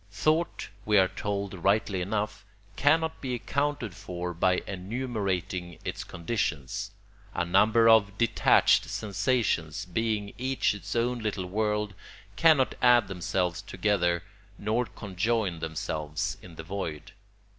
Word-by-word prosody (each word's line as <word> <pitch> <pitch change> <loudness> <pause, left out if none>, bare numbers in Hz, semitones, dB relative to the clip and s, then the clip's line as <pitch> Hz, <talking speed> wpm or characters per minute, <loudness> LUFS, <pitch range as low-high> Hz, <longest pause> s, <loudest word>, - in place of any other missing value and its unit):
Thought, 160 +2 0
we 105 -1 +3
are 95 -1 +6
told 100 +1 -3
rightly 100 +1 +1
enough, 105 +2 -2 0.3
cannot 160 +5 +2
be 130 -2 -2
accounted 140 -2 -2
for 90 -2 -5
by 90 +2 +2
enumerating 95 -4 -3
its - - -3
conditions. 85 - -3 0.5
A 85 - 0
number 110 +6 +4
of 100 -3 +5
detached 115 -1 +4
sensations, 100 - 0
being 105 +2 -1
each 130 -2 +1
its 105 - -6
own 120 +1 +1
little 105 -4 -2
world, 105 +1 -1 0.4
cannot 135 +3 +4
add 120 -4 +5
themselves 90 -1 -1
together 90 -5 0 0.3
nor 110 +3 0
conjoin 100 -1 -1
themselves 80 +3 -3
in 85 -3 -12
the 80 - -7
void. 80 -4 -5
100 Hz, 120 wpm, -28 LUFS, 90-115 Hz, 0.5 s, are